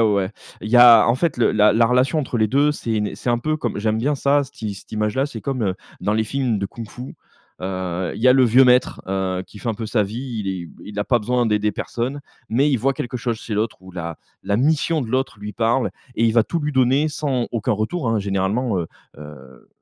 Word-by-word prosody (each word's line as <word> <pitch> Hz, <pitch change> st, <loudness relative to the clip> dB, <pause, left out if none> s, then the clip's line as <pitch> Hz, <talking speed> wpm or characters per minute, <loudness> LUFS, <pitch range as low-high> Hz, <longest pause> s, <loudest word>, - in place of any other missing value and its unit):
ouais. 100 Hz, -4 st, +2 dB, 0.3 s
Il 105 Hz, -, -6 dB
y 120 Hz, -, +5 dB
a, 120 Hz, -1 st, +8 dB
en 115 Hz, -, +3 dB
fait 165 Hz, +4 st, 0 dB
le 120 Hz, -, +2 dB
la 105 Hz, 0 st, +5 dB
la 115 Hz, +1 st, +4 dB
relation 125 Hz, +6 st, +2 dB
entre 130 Hz, -4 st, -2 dB
les 110 Hz, -2 st, +2 dB
2, 145 Hz, +4 st, +3 dB
c'est 115 Hz, -6 st, -3 dB
une, 105 Hz, -1 st, 0 dB
heu, -, -, -8 dB
c'est 120 Hz, -, -3 dB
un 120 Hz, -, +2 dB
peu 155 Hz, +6 st, -1 dB
comme 120 Hz, -8 st, -3 dB
j'aime 110 Hz, +1 st, 0 dB
bien 145 Hz, +5 st, 0 dB
ça, 140 Hz, +1 st, +2 dB
cette 135 Hz, -, -12 dB
i 105 Hz, -2 st, -3 dB
cette 95 Hz, -, -14 dB
image-là 105 Hz, +6 st, 0 dB
c'est 120 Hz, -6 st, -8 dB
comme, 130 Hz, 0 st, -3 dB
heu, 95 Hz, -3 st, 0 dB, 0.3 s
dans 105 Hz, -, 0 dB
les 110 Hz, 0 st, +1 dB
films 125 Hz, -1 st, -1 dB
de 100 Hz, -, -2 dB
kung-fu, 120 Hz, +4 st, -9 dB, 0.5 s
heu, 95 Hz, -1 st, -3 dB
il -, -, -7 dB
y 130 Hz, -, +6 dB
a -, -, +8 dB
le 130 Hz, -1 st, +5 dB
vieux 125 Hz, +3 st, +6 dB
maître, 125 Hz, 0 st, +3 dB
heu, 95 Hz, -1 st, -2 dB
qui 105 Hz, -, -13 dB
fait 100 Hz, -, -5 dB
un 115 Hz, -, 0 dB
peu 110 Hz, +1 st, -5 dB
sa 110 Hz, 0 st, +1 dB
vie, 115 Hz, +3 st, -5 dB
il -, -, -2 dB
est 90 Hz, -3 st, -4 dB, 0.2 s
il 105 Hz, 0 st, -8 dB
a 105 Hz, -, 0 dB
pas 120 Hz, -, +2 dB
besoin 120 Hz, +2 st, 0 dB
d'aider 105 Hz, -1 st, +1 dB
personne, 125 Hz, +7 st, -4 dB, 0.3 s
mais 135 Hz, +6 st, +2 dB
il 135 Hz, -, +3 dB
voit 135 Hz, +5 st, +1 dB
quelque 125 Hz, +1 st, -4 dB
chose 115 Hz, -2 st, -2 dB
chez 110 Hz, -, -5 dB
l'autre 110 Hz, +1 st, -1 dB
ou 95 Hz, 0 st, -13 dB
la 85 Hz, -2 st, -5 dB, 0.3 s
la 100 Hz, +1 st, 0 dB
mission 155 Hz, +5 st, +1 dB
de 115 Hz, -, -6 dB
l'autre 130 Hz, -2 st, -1 dB
lui 105 Hz, +1 st, -7 dB
parle 120 Hz, +3 st, +1 dB, 0.2 s
et 115 Hz, -, +1 dB
il 115 Hz, -, +3 dB
va 115 Hz, 0 st, +5 dB
tout 170 Hz, -, -2 dB
lui 150 Hz, 0 st, -2 dB
donner 130 Hz, +4 st, +3 dB
sans, 140 Hz, -5 st, -2 dB
aucun 115 Hz, +1 st, 0 dB
retour 115 Hz, -, -2 dB
hein, 115 Hz, -1 st, +1 dB
généralement, 100 Hz, +3 st, -1 dB
heu 85 Hz, -, -2 dB, 0.3 s
heu 65 Hz, -4 st, -13 dB
115 Hz, 255 wpm, -21 LUFS, 105-130 Hz, 0.5 s, a